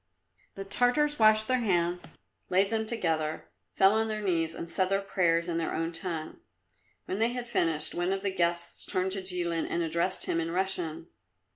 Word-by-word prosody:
The 195 Hz, -, -6 dB
Tartars 250 Hz, +8 st, +1 dB
washed 215 Hz, 0 st, +5 dB
their 255 Hz, 0 st, +2 dB
hands, 175 Hz, -5 st, -1 dB, 0.4 s
laid 195 Hz, +3 st, +2 dB
them 220 Hz, -1 st, -1 dB
together, 160 Hz, -9 st, -2 dB, 0.2 s
fell 195 Hz, +1 st, +5 dB
on 220 Hz, 0 st, +1 dB
their 215 Hz, -1 st, -3 dB
knees 165 Hz, -4 st, 0 dB
and 170 Hz, -, -6 dB
said 185 Hz, +2 st, 0 dB
their 195 Hz, 0 st, +2 dB
prayers 170 Hz, -4 st, +1 dB
in 170 Hz, -1 st, -2 dB
their 165 Hz, -, -2 dB
own 165 Hz, +1 st, -2 dB
tongue. 165 Hz, -2 st, -5 dB, 0.7 s
When 190 Hz, -, -3 dB
they 230 Hz, +2 st, +1 dB
had 245 Hz, -1 st, -5 dB
finished 165 Hz, -9 st, +2 dB
one 175 Hz, +1 st, -1 dB
of 195 Hz, 0 st, -2 dB
the 195 Hz, -1 st, -1 dB
guests 170 Hz, -1 st, -1 dB
turned 185 Hz, +1 st, -1 dB
to 195 Hz, 0 st, +2 dB
Jilin 175 Hz, -3 st, 0 dB
and 170 Hz, -, -1 dB
addressed 170 Hz, +3 st, 0 dB
him 165 Hz, -, 0 dB
in 165 Hz, 0 st, -2 dB
Russian. 170 Hz, -3 st, -1 dB
185 Hz, 185 wpm, -29 LUFS, 170-205 Hz, 0.7 s, washed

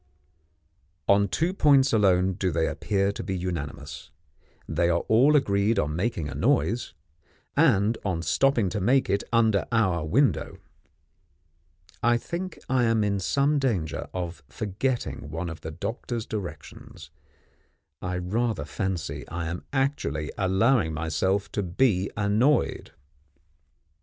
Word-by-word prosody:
On 100 Hz, 0 st, +4 dB
two 165 Hz, -, 0 dB
points 140 Hz, -7 st, +4 dB
alone 95 Hz, -3 st, +3 dB
do 95 Hz, 0 st, -1 dB
they 80 Hz, -1 st, +1 dB
appear 100 Hz, -1 st, 0 dB
to -, -, -6 dB
be 95 Hz, -2 st, -3 dB
unanimous 75 Hz, -5 st, -5 dB, 0.6 s
they 85 Hz, +2 st, +1 dB
are 85 Hz, 0 st, +2 dB
all 130 Hz, +7 st, +4 dB
agreed 105 Hz, -4 st, +2 dB
on 75 Hz, 0 st, 0 dB
making 95 Hz, -3 st, -1 dB
a 70 Hz, -, -6 dB
noise, 120 Hz, -, 0 dB, 0.6 s
and 115 Hz, -8 st, +3 dB
on 85 Hz, -5 st, -2 dB
stopping 130 Hz, -1 st, +2 dB
to 105 Hz, +2 st, -3 dB
make 130 Hz, +7 st, +2 dB
it 100 Hz, -, +1 dB
under 110 Hz, -4 st, +3 dB
our 95 Hz, -8 st, +2 dB
window. 125 Hz, -, +1 dB, 1.4 s
I 120 Hz, +1 st, +3 dB
think 175 Hz, +9 st, -5 dB
I 130 Hz, -2 st, +2 dB
am 115 Hz, -2 st, +2 dB
in 100 Hz, -1 st, 0 dB
some 140 Hz, +9 st, +1 dB
danger 105 Hz, -, -2 dB
of 85 Hz, -4 st, -5 dB
forgetting 105 Hz, -, -3 dB
one 80 Hz, +2 st, -4 dB
of 80 Hz, -, -9 dB
the 80 Hz, -, -6 dB
doctor's 115 Hz, +7 st, -4 dB
directions; 100 Hz, -5 st, -8 dB, 0.9 s
I 90 Hz, 0 st, -3 dB
rather 110 Hz, +6 st, -1 dB
fancy 95 Hz, -6 st, -4 dB
I 85 Hz, 0 st, -4 dB
am 85 Hz, +1 st, -6 dB
actually 135 Hz, -, -1 dB
allowing 95 Hz, -, +2 dB
myself 95 Hz, +5 st, -1 dB
to 105 Hz, -, -1 dB
be 95 Hz, +1 st, +1 dB
annoyed. 110 Hz, +8 st, +1 dB
100 Hz, 130 wpm, -26 LUFS, 85-120 Hz, 1.4 s, On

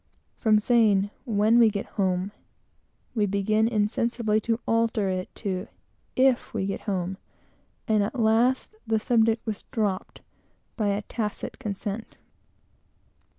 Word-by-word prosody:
From 215 Hz, -2 st, +4 dB
saying 210 Hz, -3 st, +3 dB
"when 220 Hz, 0 st, +3 dB
we 230 Hz, -2 st, +7 dB
get 200 Hz, -1 st, -3 dB
home" 190 Hz, -1 st, -1 dB, 0.8 s
we 210 Hz, -4 st, +1 dB
began 215 Hz, +3 st, +2 dB
insensibly 220 Hz, 0 st, +1 dB
to 230 Hz, +1 st, 0 dB
alter 225 Hz, -3 st, +1 dB
it 185 Hz, 0 st, -2 dB
to 190 Hz, -4 st, -3 dB, 0.5 s
"if 260 Hz, -1 st, +2 dB
we 195 Hz, -3 st, 0 dB
get 195 Hz, -, -3 dB
home" 190 Hz, 0 st, -2 dB, 0.7 s
and 215 Hz, -2 st, +3 dB
at 210 Hz, +5 st, -2 dB
last 235 Hz, -, +2 dB
the 220 Hz, -1 st, +2 dB
subject 225 Hz, -1 st, +2 dB
was 215 Hz, -3 st, -3 dB
dropped 205 Hz, -4 st, -2 dB, 0.5 s
by 215 Hz, -3 st, 0 dB
a 200 Hz, +1 st, 0 dB
tacit 210 Hz, -2 st, -4 dB
consent. 205 Hz, +1 st, -5 dB
215 Hz, 125 wpm, -26 LUFS, 200-230 Hz, 0.8 s, we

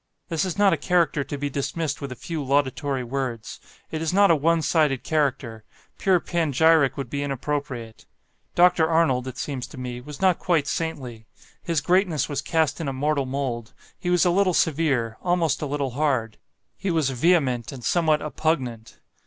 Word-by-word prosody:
This 165 Hz, +2 st, 0 dB
is 185 Hz, -1 st, -4 dB
not 205 Hz, -1 st, +5 dB
a -, -, +1 dB
character 170 Hz, -5 st, +1 dB
to 145 Hz, -, -6 dB
be 145 Hz, +1 st, -2 dB
dismissed 145 Hz, +2 st, -3 dB
with 140 Hz, -2 st, -5 dB
a -, -, -5 dB
few 160 Hz, +3 st, -5 dB
laudatory 140 Hz, 0 st, 0 dB
words; 125 Hz, -3 st, -4 dB, 0.3 s
it 155 Hz, -, -3 dB
is 160 Hz, -, 0 dB
not 200 Hz, 0 st, +5 dB
a -, -, +6 dB
one 165 Hz, +2 st, +2 dB
sided 150 Hz, -5 st, +2 dB
character; 130 Hz, -7 st, -1 dB, 0.4 s
pure 190 Hz, -2 st, +3 dB
panegyric 160 Hz, -4 st, +2 dB
would 135 Hz, -2 st, -4 dB
be 140 Hz, +4 st, -3 dB
inappropriate. 135 Hz, -4 st, -4 dB, 0.5 s
Dr. 175 Hz, -2 st, +4 dB
Arnold 155 Hz, -6 st, +2 dB
(it 130 Hz, -1 st, -7 dB
seems 130 Hz, 0 st, -4 dB
to 145 Hz, -, -13 dB
me) 125 Hz, -1 st, -5 dB
was 145 Hz, +2 st, -10 dB
not 185 Hz, -3 st, +3 dB
quite 165 Hz, -6 st, +1 dB
saintly; 130 Hz, -9 st, -4 dB, 0.3 s
his 165 Hz, -4 st, -1 dB
greatness 180 Hz, -2 st, +2 dB
was 145 Hz, -, -3 dB
cast 160 Hz, -2 st, 0 dB
in 160 Hz, -, -3 dB
a 135 Hz, -, -2 dB
mortal 140 Hz, 0 st, 0 dB
mould; 130 Hz, -4 st, -3 dB, 0.3 s
he 175 Hz, -, -3 dB
was 180 Hz, -1 st, +3 dB
a 175 Hz, -, +4 dB
little 185 Hz, -1 st, +2 dB
severe, 135 Hz, -8 st, +1 dB
almost 175 Hz, -4 st, +1 dB
a 150 Hz, -, -2 dB
little 140 Hz, -2 st, -2 dB
hard; 130 Hz, -5 st, -1 dB, 0.4 s
he 195 Hz, -, -2 dB
was 160 Hz, -6 st, +1 dB
vehement 130 Hz, -4 st, +1 dB
and 130 Hz, -3 st, -9 dB
somewhat 155 Hz, +4 st, +2 dB
oppugnant. 130 Hz, -6 st, -2 dB
145 Hz, 180 wpm, -24 LUFS, 130-165 Hz, 0.5 s, a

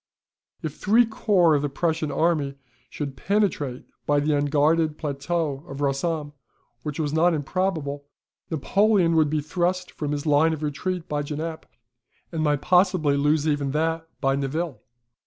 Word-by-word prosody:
If 155 Hz, -2 st, -4 dB
three 225 Hz, +4 st, +4 dB
corps 200 Hz, -7 st, +3 dB
of 145 Hz, -, +2 dB
the 145 Hz, -, -1 dB
Prussian 160 Hz, +1 st, -1 dB
army 155 Hz, -5 st, +1 dB, 0.3 s
should 140 Hz, -3 st, -5 dB
penetrate 170 Hz, -10 st, -1 dB, 0.2 s
by 145 Hz, 0 st, +3 dB
the 150 Hz, +1 st, +1 dB
unguarded 150 Hz, +2 st, +2 dB
plateau 145 Hz, 0 st, -2 dB
of 135 Hz, -3 st, -7 dB
Rossomme, 145 Hz, +2 st, -1 dB, 0.5 s
which 150 Hz, +3 st, -5 dB
was 150 Hz, -2 st, -1 dB
not 165 Hz, +2 st, +3 dB
improbable, 150 Hz, -2 st, -2 dB, 0.4 s
Napoleon 185 Hz, +2 st, +2 dB
would 155 Hz, -2 st, +4 dB
be 155 Hz, 0 st, 0 dB
thrust 180 Hz, +4 st, -1 dB
from 150 Hz, -2 st, -4 dB
his 145 Hz, 0 st, -3 dB
line 155 Hz, +2 st, +4 dB
of 155 Hz, -1 st, -5 dB
retreat 170 Hz, +4 st, -3 dB
by 150 Hz, -2 st, -1 dB
Genappe, 155 Hz, +2 st, -5 dB, 0.6 s
and 165 Hz, -2 st, -2 dB
might 145 Hz, -2 st, +1 dB
possibly 180 Hz, -5 st, +3 dB
lose 150 Hz, +2 st, +2 dB
even 145 Hz, -2 st, 0 dB
that 160 Hz, +1 st, 0 dB
by 135 Hz, -1 st, +2 dB
Nivelles. 140 Hz, +3 st, -2 dB
155 Hz, 150 wpm, -24 LUFS, 145-170 Hz, 0.6 s, three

